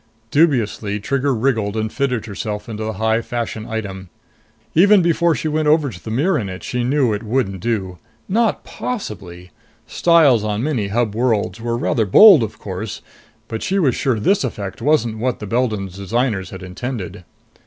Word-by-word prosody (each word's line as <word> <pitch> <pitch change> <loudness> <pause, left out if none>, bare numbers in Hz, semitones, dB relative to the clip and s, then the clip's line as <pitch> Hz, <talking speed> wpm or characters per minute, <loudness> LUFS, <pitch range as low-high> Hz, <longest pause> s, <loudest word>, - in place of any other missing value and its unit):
Dubiously, 115 -9 +1
Trigger 135 +5 0
wriggled 110 -4 0
and 110 0 -2
fitted 125 -5 -1
herself 105 0 -5
into 110 -1 -5
the 110 0 -3
high 110 +2 +1
fashion 115 -2 -4
item. 95 -4 -5 0.6
Even 195 +3 +6
before 170 -1 +2
she 135 +5 -3
went 155 0 0
over 150 -3 +3
to 90 - -12
the - - -6
mirror 145 +13 +1
in 100 -4 -4
it, 95 0 -8
she 125 -1 -2
knew 130 -2 +2
it 105 - -3
wouldn't 110 -4 -1
do. 95 -5 -3 0.3
Not 225 +2 +1
possibly! 95 - -6 0.3
Styles 155 -10 +4
on 105 +1 -2
many 130 -9 -1
Hub 110 +1 0
worlds 110 -4 0
were 115 0 -1
rather 115 -2 0
bold 195 - +8
of 110 -1 -4
course, 95 +2 -6 0.4
but 110 - -5
she 195 - -1
was 145 -10 +3
sure 125 -4 0
this 195 - +2
effect 100 -3 -5
wasn't 120 -7 +1
what 125 +1 -1
the 105 - -7
Beldon's 105 -4 -2
designers 100 0 -1
had 95 0 -9
intended. 95 0 -6
115 Hz, 175 wpm, -19 LUFS, 105-140 Hz, 0.6 s, bold